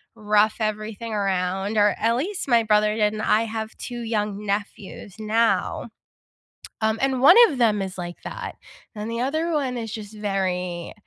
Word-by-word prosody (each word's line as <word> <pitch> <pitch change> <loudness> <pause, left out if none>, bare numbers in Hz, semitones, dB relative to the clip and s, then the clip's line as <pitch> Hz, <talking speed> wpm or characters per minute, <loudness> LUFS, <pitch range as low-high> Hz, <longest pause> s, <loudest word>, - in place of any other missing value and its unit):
rough 210 -1 +2
everything 215 +1 -3
around, 195 +1 -1
or, 205 0 +4
at 230 +1 +2
least 360 +9 -3
my 235 -3 +4
brother 210 0 +3
did, 210 -1 +2
and 215 - -4
I 215 +1 +3
have 220 -1 -5
2 240 -1 -6
young 210 -2 -2
nephews 200 -1 -4
now. 225 +2 0 0.9
Um, 220 0 +1
and 265 -1 +1
one 345 - +8
of 275 - -4
them 215 -4 +3
is 190 -1 -5
like 175 -1 -7
that, - - -6 0.4
and 210 +2 -5
the 230 +1 -2
other 315 +6 -1
one 265 -4 -1
is 225 -2 -5
just 215 -1 -8
very 185 -4 -2
215 Hz, 170 wpm, -23 LUFS, 205-230 Hz, 0.9 s, one